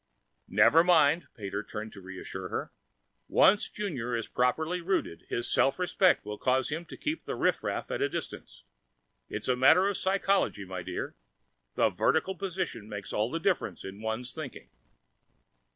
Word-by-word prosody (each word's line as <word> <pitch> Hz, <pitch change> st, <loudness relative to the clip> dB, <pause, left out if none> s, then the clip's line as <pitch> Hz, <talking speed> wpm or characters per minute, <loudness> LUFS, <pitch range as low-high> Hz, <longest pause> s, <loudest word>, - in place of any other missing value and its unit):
"Never 110 Hz, -, +6 dB
mind." 165 Hz, -2 st, +4 dB
Pater 100 Hz, -1 st, -4 dB
turned 110 Hz, +1 st, -7 dB
to 100 Hz, -, -11 dB
reassure 95 Hz, 0 st, -7 dB
her. -, -, -4 dB, 0.6 s
"Once 205 Hz, +2 st, +4 dB
Junior 135 Hz, -, -3 dB
is 115 Hz, -, -3 dB
properly 160 Hz, +8 st, 0 dB
rooted, 170 Hz, -, -2 dB
his 120 Hz, -, -1 dB
self 135 Hz, -, +3 dB
respect 185 Hz, -, +3 dB
will 105 Hz, 0 st, -6 dB
cause 130 Hz, 0 st, +2 dB
him 160 Hz, +3 st, -3 dB
to -, -, -10 dB
keep 310 Hz, +2 st, -2 dB
riffraff -, -, -1 dB
at -, -, -2 dB
a 410 Hz, -, +2 dB
distance. -, -, -6 dB, 0.7 s
It's -, -, -4 dB
a 130 Hz, -, +3 dB
matter 160 Hz, +9 st, +6 dB
of 200 Hz, -, 0 dB
Psychology, 195 Hz, -, +1 dB
my 95 Hz, -1 st, -5 dB
dear; -, -, -5 dB, 0.6 s
the -, -, +4 dB
vertical 175 Hz, +4 st, +1 dB
position 185 Hz, -, -4 dB
makes 100 Hz, -2 st, -6 dB
all 105 Hz, +2 st, +1 dB
the 165 Hz, -, -2 dB
difference 185 Hz, +1 st, -1 dB
in 95 Hz, +2 st, -8 dB
one's 110 Hz, +3 st, -3 dB
thinking." 155 Hz, -5 st, -8 dB
135 Hz, 155 wpm, -29 LUFS, -, 0.7 s, Never